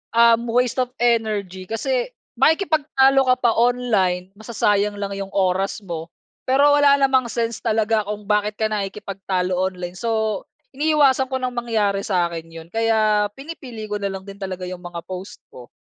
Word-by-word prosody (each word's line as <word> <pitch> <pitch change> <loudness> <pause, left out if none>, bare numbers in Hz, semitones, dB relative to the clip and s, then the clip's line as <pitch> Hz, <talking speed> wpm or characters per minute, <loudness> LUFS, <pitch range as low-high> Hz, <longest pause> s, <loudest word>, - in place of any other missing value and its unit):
um, 235 0 +5
waste 250 +1 +2
of 250 - -1
energy 215 -6 0
kasi, - - -1 0.3
makikipagtalo 290 -4 +3
ka 255 - +5
pa 235 - +5
online 215 -7 +1
masasayang 210 -2 0
lang 200 -1 -4
'yong 195 0 -5
oras 195 +2 0
mo. 165 -3 -6 0.4
Pero 280 +3 +5
wala 290 -1 +5
namang 265 -3 +2
sense 230 -1 -2
talaga 220 -1 +1
kung 210 0 -5
bakit 210 0 +1
ka 220 - 0
nakikipagtalo 195 -2 -3
online 180 -1 -2
so, 220 -2 -1 0.3
iniiwasan 280 -2 +3
ko 260 - -3
nang 255 -1 -2
mangyari 220 -5 0
sa 185 -4 +1
akin 165 -1 -6
'yon. 165 0 -11
Kaya 215 -2 +2
pinipili 270 -6 -8
ko 210 -1 -4
na 200 - 0
lang 190 0 -6
din 200 0 -11
talaga 190 -2 -5
'yong 180 0 -7
mga 175 -1 -7
post 185 +2 -7
ko. 125 -1 -12
215 Hz, 165 wpm, -21 LUFS, 195-250 Hz, 0.4 s, um